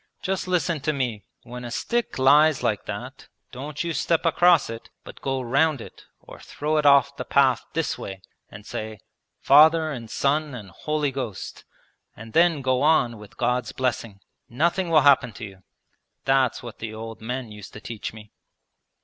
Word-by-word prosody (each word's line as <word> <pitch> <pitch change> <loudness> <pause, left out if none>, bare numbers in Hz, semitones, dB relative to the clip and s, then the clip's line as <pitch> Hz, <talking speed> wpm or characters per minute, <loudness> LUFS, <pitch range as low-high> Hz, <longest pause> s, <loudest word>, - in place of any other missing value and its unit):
Just 190 -1 -2
listen 175 -3 0
to 155 +2 -1
me. 125 -7 -3 0.2
When 125 +1 -9
a 120 - -6
stick 235 - -2
lies 145 +3 +5
like - - -1
that - - -7 0.2
don't 145 +5 -5
you 170 -1 -2
step 165 +4 0
across 170 -1 +4
it, 115 0 -8
but - - -12
go 135 -1 -1
round 140 +4 +1
it - - -12
or - - -14
throw 155 +1 -2
it 150 -1 +3
off 140 0 +5
the - - -3
path 135 -3 +3
this 165 0 -2
way, 95 -1 -8 0.3
and 100 +1 -12
say 110 0 -6 0.4
"Father 155 +2 +6
and 120 -5 -7
Son 140 +3 0
and 105 -6 -9
Holy 150 - -2
Ghost," 125 -7 -6 0.5
and 110 +1 -11
then 165 -4 +3
go 130 -1 +1
on 125 -7 +2
with 105 -1 -14
God's 125 0 -1
blessing. 115 -5 -3 0.3
Nothing 170 +8 0
will 155 -2 +5
happen 135 -4 +4
to 115 - -7
you. 95 -2 -13 0.6
That's 135 -2 +2
what 120 -2 -9
the 110 -1 -6
old 115 0 -8
men 125 0 -5
used 105 -1 -11
to - - -9
teach 110 -1 -6
me.' 105 -1 -14
130 Hz, 175 wpm, -24 LUFS, 115-155 Hz, 0.6 s, Father